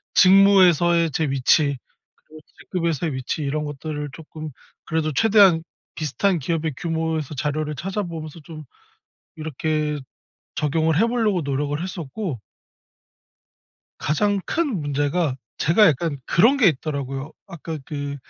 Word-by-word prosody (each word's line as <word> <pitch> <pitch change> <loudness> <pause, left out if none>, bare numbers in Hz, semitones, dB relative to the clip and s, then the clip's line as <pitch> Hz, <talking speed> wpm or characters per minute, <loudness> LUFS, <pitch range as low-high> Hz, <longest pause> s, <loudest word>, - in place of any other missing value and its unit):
직무에서의 180 -4 +5
제 160 - 0
위치 140 +1 +2 0.5
그리고 155 0 -14 0.2
직급에서의 165 -4 -2
위치 130 +4 -3
이런 150 +2 -1
것들을 150 0 -5
쪼끔 155 0 -8 0.4
그래도 160 -1 -1
최대한 200 -3 +5 0.3
비슷한 165 +4 0
기업의 160 +1 -2
규모에서 160 -3 -2
자료를 150 +2 -2
찾아보면서 170 -3 -5
좀 155 0 -10 0.7
이렇게 155 -1 -2 0.6
적용을 155 +2 +1
해보려고 225 -5 +1
노력을 145 +2 -2
했었고 175 - -5 1.6
가장 200 +7 +1
큰 290 - -1
문제가 145 +1 0 0.2
제가 175 +7 +4
약간 150 0 0
그런 230 +11 +4
게 225 -8 +5
있더라고요. 140 -1 -4
아까 165 -3 -6
그 145 -1 -4
155 Hz, 285 characters per minute, -22 LUFS, 145-175 Hz, 1.6 s, 직무에서의